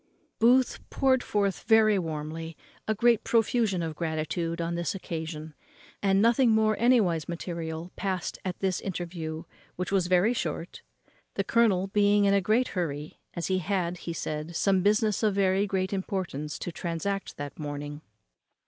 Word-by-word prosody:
Booth 250 +3 +4
poured 260 -2 +2
forth 200 -4 0
very 215 -2 +5
warmly 160 0 -5 0.3
a 220 - +1
great 235 +1 +3
profusion 225 -5 +2
of 160 -1 -4
gratitude 165 +1 -2
on 170 0 -1
this 170 +1 -2
occasion; 160 -3 -5 0.5
and 195 -1 +3
nothing 235 +3 +4
more 220 -1 +3
anywise 210 -10 +3
material 170 0 -5
passed 190 -3 -3
at 185 -2 -3
this 190 -2 0
interview, 170 -4 -4 0.3
which 180 +1 -3
was 190 -3 +2
very 185 +6 +4
short, 170 -5 -4 0.5
the - - 0
colonel 210 -6 +3
being 205 +1 +3
in 200 - +4
a 200 - +4
great 225 +7 +2
hurry, 150 -5 -4 0.2
as 170 - -2
he 185 0 +1
had, 180 -1 -1
he 170 - -6
said, 155 0 -4
some 190 +2 +3
business 210 +1 +2
of 210 -3 +2
very 195 +1 +2
great 190 0 -1
importance 185 -6 -3
to 175 - -5
transact 180 +4 -3
that 145 +1 -7
morning. 145 0 -5
185 Hz, 155 wpm, -28 LUFS, 165-205 Hz, 0.5 s, very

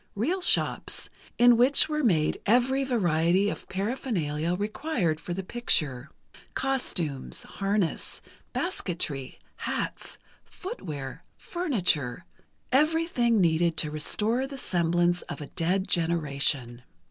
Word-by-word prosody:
real 330 - 0
shops, - - +1 0.3
in 240 -1 +6
which 255 +4 +6
were 305 -1 -1
made 160 -10 +2
every 250 +5 +3
variety 185 -5 +2
of - - -8
paraphernalia 185 - -1
required 205 - -1
for 175 - -7
the 190 +2 -3
picture: 155 - +1 0.5
costumes, 175 - -1
harness, 195 -3 -2 0.3
basketry, 165 - -2 0.2
hats, - - -4 0.3
footwear, 150 - -7
furniture—everything 250 - 0
needed 165 -1 +2
to 150 - 0
restore 220 - -1
the 275 0 -8
semblance 175 -4 +1
of - - -5
a 150 - -6
dead 180 +5 -1
generation. 140 -7 0
185 Hz, 100 wpm, -27 LUFS, 160-245 Hz, 0.5 s, in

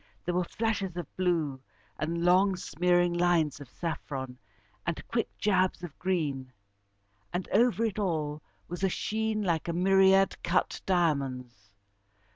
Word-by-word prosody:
There 175 - -1
were 180 +1 +1
flashes 200 -2 -2
of 175 -5 -6
blue, 165 -7 0 0.4
and 170 +3 -1
long 185 +2 +4
smearing 175 -1 +1
lines 175 -5 +2
of 140 -4 -11
saffron, 130 -5 -5 0.4
and 170 -2 -4
quick 230 -1 -1
jabs 185 -3 +1
of 170 -5 -7
green. 150 -8 -1 0.8
And 175 +1 -3
over 230 +1 +3
it 215 -1 -2
all 155 -6 -1 0.3
was 175 +2 -6
a 190 - +3
sheen 220 +2 -1
like 170 -4 0
a 170 - -1
myriad 195 +2 +4
cut 175 +2 0
diamonds. 135 - -1
175 Hz, 135 wpm, -29 LUFS, 155-190 Hz, 0.8 s, long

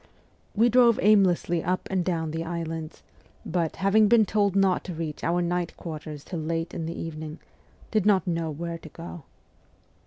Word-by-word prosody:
We 225 +3 +5
drove 240 -1 +5
aimlessly 185 -5 +3
up 185 +1 -1
and 185 -2 +1
down 165 -3 -1
the 165 +1 -3
islands, 165 -1 -5 0.4
but, 170 -2 -1
having 210 +2 +4
been 220 0 +5
told 200 -1 +1
not 195 -2 +3
to 180 - -5
reach 155 -2 -5
our 175 +1 +1
night 175 0 -2
quarters 155 -3 -7
till 175 - -5
late 165 +1 -2
in 165 -1 -4
the 170 - -5
evening, 155 -1 -6 0.5
did 215 -3 +2
not 195 -5 +4
know 165 -2 -1
where 165 +2 -5
to 160 - -11
go. 165 -1 -9
170 Hz, 175 wpm, -26 LUFS, 165-195 Hz, 0.5 s, We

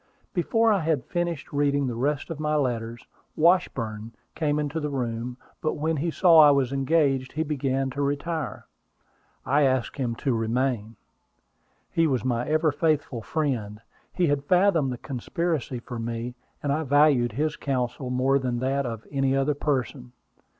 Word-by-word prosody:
Before 225 +5 +2
I 200 - +2
had 155 -6 0
finished 170 -5 -3
reading 145 -1 +2
the 125 - -2
rest 145 +6 -1
of 155 - -5
my 150 0 0
letters, 120 -4 -2 0.3
Washburn 115 -10 +1 0.2
came 150 -2 0
into 150 +1 -2
the 150 -1 -2
room; 120 -2 -3 0.2
but 155 - 0
when 160 +1 -1
he 165 +5 -1
saw 165 0 +5
I 150 -1 +9
was 140 -2 +2
engaged, 135 -2 +1
he 155 - 0
began 135 -3 -1
to 140 - -3
retire. 145 -1 -2 0.8
I 145 +3 +3
asked 130 -3 +1
him 120 -4 -1
to 130 +2 -1
remain. 115 -1 -1 1.0
He 165 -1 +3
was 130 -4 -1
my 120 -1 0
ever 155 0 +3
faithful 145 -5 0
friend. 115 -7 -2 0.3
He 180 - +1
had 145 -2 0
fathomed 180 -6 +3
the 125 - -4
conspiracy 140 +2 -3
against 120 0 -7
me, 120 +1 -4 0.3
and 140 -1 +1
I 155 - 0
valued 140 -5 +3
his 150 +5 -1
counsel 130 -1 -2
more 130 +2 +2
than 125 -2 -2
that 135 +2 0
of 115 -2 -6
any 135 -1 +1
other 135 +2 +2
person. 130 -3 -2
140 Hz, 165 wpm, -26 LUFS, 125-155 Hz, 1.0 s, I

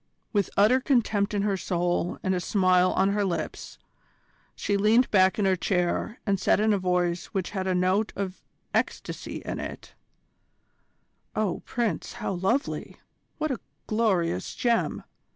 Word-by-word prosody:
With 205 -3 +1
utter 215 +6 +5
contempt 220 -6 +1
in 200 - +1
her 205 -1 +1
soul 175 -1 -1
and 190 - +1
a 180 - 0
smile 185 0 +3
on 195 +1 +3
her 205 +1 +1
lips, 185 -3 -4 0.8
she 205 - -1
leaned 220 +5 +4
back 190 -2 +4
in 205 - +1
her 190 -1 +4
chair 180 +5 -1
and 200 -3 +1
said - - +3
in 215 0 +3
a 200 - +1
voice 180 -1 0
which 190 -4 -3
had 190 -2 -2
a 185 - +1
note 185 +4 +2
of 190 -2 -4 0.3
ecstasy - - -2
in - - -3
it: - - -7 1.4
"Oh, 210 -5 -1
Prince, 225 -10 -2
how 235 -4 -3
lovely! 195 +10 -1 0.4
What 310 -1 -1
a 255 - -2 0.3
glorious 190 - 0
gem! 235 -2 0
195 Hz, 150 wpm, -27 LUFS, 185-215 Hz, 1.4 s, utter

